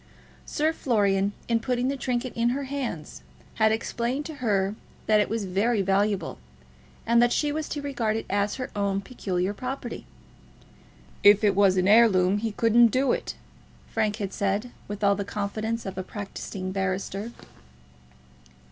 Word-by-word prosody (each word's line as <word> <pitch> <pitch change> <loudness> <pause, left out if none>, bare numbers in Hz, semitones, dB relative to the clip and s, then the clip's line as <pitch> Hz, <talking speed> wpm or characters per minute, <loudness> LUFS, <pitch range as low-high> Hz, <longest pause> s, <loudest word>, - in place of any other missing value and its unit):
Sir 310 +1 +1
Florian, 200 -8 +1 0.2
in 230 -1 +2
putting 250 +1 -1
the 275 - 0
trinket 250 -1 -2
into 235 +2 +1
her 280 - -3
hands, 250 - -5 0.4
had 220 0 +5
explained 240 +5 -2
to 320 - -6
her 200 -4 +1 0.3
that 215 -1 +4
it 210 - +1
was 225 -1 -2
very 200 +3 +1
valuable, 200 +1 0 0.7
and 235 +1 +4
that 240 0 +4
she 295 +3 +1
was 310 0 -3
to 290 - -4
regard 240 -6 -1
it 225 - -5
as 200 +1 0
her 255 -1 -5
own 200 -1 0
peculiar 190 -4 -2
property. 250 +2 -6 1.1
"If 205 +1 +7
it 205 -2 +4
was 195 -2 +4
an 185 0 +2
heirloom 205 -3 +5
he 225 +1 -2
couldn't 230 +2 +5
do 260 +4 +1
it," - - -2 0.6
Frank 215 -2 0
had 200 -3 -4
said, 200 +4 -1 0.2
with 205 0 -6
all 200 0 +5
the 200 0 -2
confidence 215 +3 -3
of 190 -1 -5
a - - -3
practising 195 -1 -6
barrister. 195 +3 -2
215 Hz, 160 wpm, -26 LUFS, 200-240 Hz, 1.1 s, If